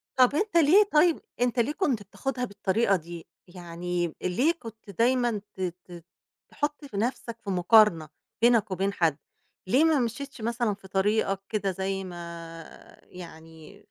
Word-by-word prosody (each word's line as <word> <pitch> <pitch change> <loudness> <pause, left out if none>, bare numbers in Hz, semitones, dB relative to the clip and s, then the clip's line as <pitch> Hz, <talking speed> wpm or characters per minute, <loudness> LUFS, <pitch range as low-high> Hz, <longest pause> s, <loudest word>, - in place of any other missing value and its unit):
طَب 255 +1 +4
أنت 400 +1 +1
ليه 335 +7 +6
طيب 320 +2 +4 0.2
أنت 245 0 +1
ليه 245 +6 +2
كنت 275 - -1
بتاخُدها 250 +5 -4
بالطريقة 200 0 +1
دي، 170 -1 -8 0.2
يعني 175 -1 -4
ليه 245 - +2
كنت 220 -3 -12
دايمًا 240 +1 +1
ت 190 - -8
ت 175 -1 -6 0.5
تحُط 295 0 -3
في 220 -8 -8
نَفْسك 235 +1 -2
في 200 - -6
مقارنة 180 -4 +4 0.3
بينك 230 -4 +4
وبين 195 +2 -1
حد، 160 -6 +1 0.5
ليه 265 +10 +4
ما 315 -4 +4
مشيتش 250 +2 -4
مثلًا 235 -1 -1
في 195 -1 -13
طريقك 195 0 +1
كده 200 -3 -1
زي 195 +1 -3
ما 170 -2 -8 0.4
يعني 165 0 -13
200 Hz, 145 wpm, -27 LUFS, 180-245 Hz, 0.5 s, ليه